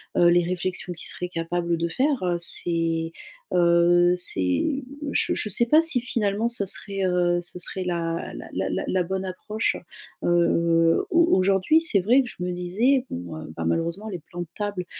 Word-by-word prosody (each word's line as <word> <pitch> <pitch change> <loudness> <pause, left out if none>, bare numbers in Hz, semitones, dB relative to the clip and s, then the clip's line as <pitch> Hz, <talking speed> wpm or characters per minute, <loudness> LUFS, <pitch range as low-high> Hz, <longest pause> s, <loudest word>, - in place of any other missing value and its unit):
heu, 175 - +5
les 175 0 +3
réflexions 180 0 -3
qu'il 170 - -5
serait 180 - -3
capable 170 0 -2
de 170 +1 -1
faire 270 - 0
c'est, 165 -1 -1 0.4
heu, 175 0 +4
c'est 180 - 0 0.3
je - - +1
je 215 - -1
sais 225 +4 +3
pas 305 +7 +5
si 325 -7 +2
finalement 220 -3 -1
ça 235 -4 +2
serait, 195 +1 -3
heu, 175 -1 +2
ce 175 +1 -5
serait 185 +1 -3
la 170 -2 -3
la - - -8 0.2
la - - -2
la 185 -1 +1
bonne 190 +2 -3
approche. 210 +4 -2 0.5
Heu, 170 -1 +3
au 335 - +2 0.2
aujourd'hui 195 - +3
c'est 315 -11 +3
vrai 235 +9 +4
que 255 - -5
je - - -12
me 180 - -2
disais, 210 +10 +1
bon 85 -2 -6
heu, 80 - -8
bah, 85 - -3
malheureusement 170 - -1
les 180 -4 -5
plans 175 +2 -8
de 175 - -5
table, 205 -3 -3
180 Hz, 180 wpm, -24 LUFS, 170-205 Hz, 0.5 s, heu